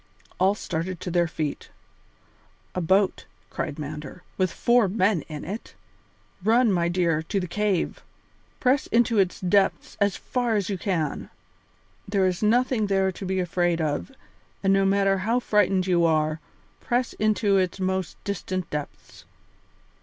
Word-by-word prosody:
All 190 +2 +3
started 175 -2 -4
to 180 - -4
their 175 0 +2
feet. 155 -3 -4 1.0
"A 180 - -2
boat," 190 +3 +2 0.2
cried 150 -3 -4
Mander, 150 +3 -7
"with 185 -2 +1
four 240 -3 +3
men 190 -2 +1
in 150 -1 -6
it? 205 +7 -7 0.7
Run, 230 +2 +4
my 170 -2 +1
dear, 170 -3 +1
to 195 +5 -2
the 180 - -3
cave; 200 0 -1 0.6
press 265 +2 +2
into 230 -2 +3
its 185 -2 +1
depths 195 +1 +1
as 200 -1 +3
far 245 -3 -1
as 200 -2 0
you 195 - -1
can. 165 -8 -2 0.8
There 195 -1 +2
is 185 -1 0
nothing 230 0 +2
there 195 -1 +2
to 190 - -8
be 190 0 0
afraid 175 -1 0
of, 155 - -2 0.5
and 195 0 +4
no 195 0 +3
matter 195 0 +2
how 225 +6 +1
frightened 195 -5 +2
you 175 -2 +2
are, 155 -1 +1 0.4
press 245 0 -1
into 210 -2 +2
its 185 0 0
most 190 -1 -2
distant 185 -3 -3
depths. 150 -1 -7
190 Hz, 150 wpm, -25 LUFS, 175-210 Hz, 1.0 s, Run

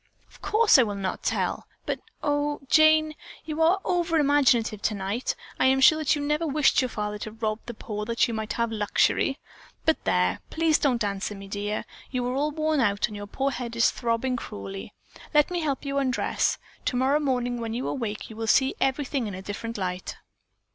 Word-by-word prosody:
"Of - - -20
course 430 -8 +5
I - - +8
will 210 -4 -1
not 195 -1 -3
tell, - - -1 0.2
but, - - -2 0.2
oh, 290 -1 0
Jane, 310 +1 +5 0.3
you 310 0 -3
are 340 +4 +4
over 345 -2 +1
imaginative 265 -8 +3
tonight. 205 +3 -1 0.2
I - - +4
am 265 0 +4
sure 310 +4 +6
that 310 -2 +2
you 290 - -3
never 300 +3 0
wished 290 -1 +3
your 255 - -1
father 210 -2 -4
to 215 - -6
rob 220 -1 -2
the 240 - -6
poor 210 -1 -5
that 230 +1 +2
you 235 - -4
might 220 -1 -3
have 235 -1 -1
luxury. 220 +5 +1 0.5
But 320 - +2
there, 90 0 +2
please 320 -1 +2
don't 250 -5 +1
answer 200 0 -2
me, 195 0 -10
dear. 205 +1 -3 0.2
You 250 -2 -2
are 250 - -1
all 285 +3 +1
worn 310 0 0
out 205 -5 +2
and 210 - -8
your 205 0 -7
poor 270 +6 -1
head 240 -2 -5
is 235 - +4
throbbing 240 +2 -1
cruelly. 195 -4 -7 0.4
Let 295 +3 +5
me 350 - -1
help 290 -4 -2
you 280 0 0
undress. 260 -2 0 0.3
Tomorrow 265 +3 +2
morning 245 -4 -1
when 225 0 -3
you 250 - -2
awake 225 -6 -3
you 220 - -11
will 225 0 -4
see 265 +4 +4
everything 270 -2 0
in 200 - -5
a 190 - -8
different 225 +3 -5
light." 180 -1 -4
250 Hz, 200 wpm, -26 LUFS, 215-290 Hz, 0.5 s, I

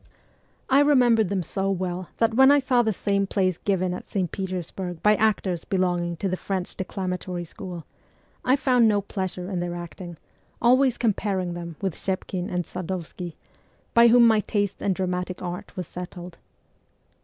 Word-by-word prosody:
I 265 +1 +5
remembered 245 -8 +4
them 195 -2 -1
so 195 +4 -2
well 185 -1 -2
that 230 0 +2
when 265 +3 +7
I 290 - +6
saw 255 -3 +3
the 220 -2 +1
same 200 0 0
plays 185 -3 0
given 185 -2 0
at 180 - -7
St. 185 -5 -2
Petersburg 185 -2 -5
by 210 0 +6
actors 195 -5 +1
belonging 175 -3 0
to 195 - -2
the 185 - 0
French 185 -1 -4
declamatory 180 -2 -4
school, 175 -1 -8 0.6
I 255 - +4
found 255 -4 +4
no 205 -2 +3
pleasure 185 -2 -4
in 185 - -1
their 175 0 -3
acting, 175 0 -8 0.4
always 255 +1 +4
comparing 195 -5 0
them 170 -1 -6
with 190 -3 0
Schepkin 185 0 -3
and 180 0 -1
Sad6vskiy, 180 0 -5 0.6
by 235 0 +7
whom 235 +1 +7
my 220 -2 +5
taste 205 -2 -1
in 200 - +1
dramatic 180 -1 -2
art 180 +1 -6
was 180 - -3
settled. 180 0 -8
190 Hz, 165 wpm, -25 LUFS, 180-215 Hz, 0.6 s, when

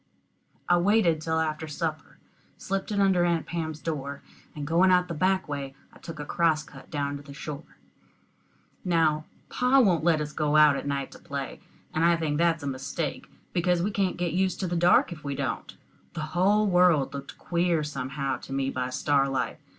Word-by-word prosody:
I 175 - +5
waited 175 -4 +3
till 160 0 0
after 155 0 -2
supper, 155 0 -4 0.4
slipped 195 +2 -3
it 205 - 0
under 190 -3 +4
Aunt 170 -2 +1
Pam's 160 -2 -4
door, 140 -4 -4 0.3
and 145 -1 -5
going 170 +5 +4
out 180 -1 +4
the 170 - -4
back 185 +4 +1
way 140 -2 -5 0.2
I - - -16
took 165 -3 -9
a 150 - -4
cross 160 -1 +1
cut - - -14
down 145 -2 -2
to - - -11
the 140 -1 -12
shore. 150 +1 -8 1.1
Now 160 -4 +2 0.2
pa 250 +2 +3
won't 185 -10 +3
let 165 -2 +3
us 150 0 -4
go 150 -1 0
out 150 -2 +7
at 140 - -4
night 140 -1 -2
to - - -13
play, 140 -1 -6 0.3
and 160 - +1
I 170 0 +5
think 155 -2 -1
that's 165 -2 +2
a - - -3
mistake, 140 +3 -4 0.3
because 175 -1 +1
we 205 - 0
can't 195 -2 0
get 175 -2 -1
used 185 +1 0
to 185 - -1
the 175 - -2
dark 175 +2 +4
if 155 -3 -8
we 140 -1 -3
don't. 135 -2 -4 0.4
The 170 - -4
whole 200 +4 +3
world 180 -7 +3
looked 140 -1 -8
queer 170 -2 0
somehow 140 -1 -3
to - - -12
me 135 0 0
by 125 0 -2
starlight. 135 0 0
160 Hz, 195 wpm, -27 LUFS, 145-175 Hz, 1.1 s, out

